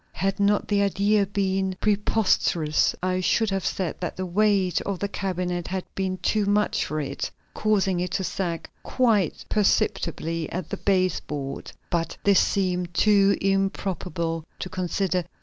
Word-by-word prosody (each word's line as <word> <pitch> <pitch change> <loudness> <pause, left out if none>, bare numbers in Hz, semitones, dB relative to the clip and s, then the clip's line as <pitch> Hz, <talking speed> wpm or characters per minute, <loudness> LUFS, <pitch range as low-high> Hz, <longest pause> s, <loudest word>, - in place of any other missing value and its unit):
Had 195 +1 -1
not 205 0 +2
the 205 -1 +2
idea 200 +1 +2
been 190 -1 0
preposterous, 200 -6 +2
I 185 0 +1
should 215 +3 +2
have 195 -1 -1
said 185 -4 -2
that 175 - -4
the 185 - -2
weight 195 0 +2
of 200 -2 -3
the 200 - -2
cabinet 180 -3 -3
had 185 0 -3
been 190 -1 -2
too 210 -2 +1
much 210 +1 +2
for 155 - -3
it, 140 -1 -3 0.2
causing 195 -4 +1
it 180 +1 -1
to 190 - 0
sag 175 -3 -3
quite 220 -9 +1
perceptibly 165 -6 0
at 180 -3 -4
the - - -2
base 185 -3 +1
board. 140 -2 -6 0.2
But 165 -1 -1
this 200 -2 +5
seemed 180 -3 0
too 200 -2 +4
improbable 190 -4 -1
to 185 - -5
consider. 185 0 -1
190 Hz, 150 wpm, -25 LUFS, 175-200 Hz, 0.2 s, this